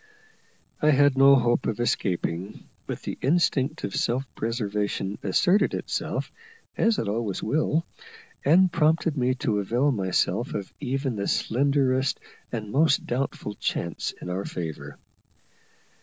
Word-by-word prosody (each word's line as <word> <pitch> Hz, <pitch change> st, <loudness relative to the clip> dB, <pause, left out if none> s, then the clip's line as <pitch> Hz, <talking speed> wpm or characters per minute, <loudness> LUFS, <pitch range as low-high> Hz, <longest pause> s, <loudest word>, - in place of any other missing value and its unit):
I 150 Hz, -, +4 dB
had 145 Hz, -1 st, +4 dB
no 135 Hz, +1 st, +7 dB
hope 120 Hz, -1 st, +2 dB
of 115 Hz, 0 st, -2 dB
escaping, 95 Hz, -5 st, -2 dB, 0.2 s
but -, -, -5 dB
the -, -, -5 dB
instinct 150 Hz, -1 st, +1 dB
of 100 Hz, -, -3 dB
self 125 Hz, +3 st, 0 dB
preservation 105 Hz, -3 st, -2 dB
asserted 180 Hz, -, +2 dB
itself, -, -, -3 dB, 0.4 s
as 225 Hz, -2 st, +2 dB
it 110 Hz, -, -2 dB
always 105 Hz, -2 st, -2 dB
will, 155 Hz, +6 st, +1 dB, 0.6 s
and 175 Hz, +5 st, +5 dB
prompted 160 Hz, -1 st, +2 dB
me 130 Hz, -2 st, +1 dB
to 120 Hz, -7 st, 0 dB
avail 120 Hz, +8 st, +1 dB
myself 95 Hz, +2 st, 0 dB
of 100 Hz, -2 st, -5 dB
even 135 Hz, -3 st, -2 dB
the 100 Hz, -, -2 dB
slenderest 135 Hz, +1 st, +1 dB, 0.3 s
and 105 Hz, -3 st, -4 dB
most 140 Hz, 0 st, +3 dB
doubtful 120 Hz, -4 st, -3 dB
chance -, -, -3 dB
in 90 Hz, -, -6 dB
our 95 Hz, +2 st, -2 dB
favour. 80 Hz, -7 st, -6 dB
125 Hz, 130 wpm, -26 LUFS, 105-145 Hz, 0.6 s, no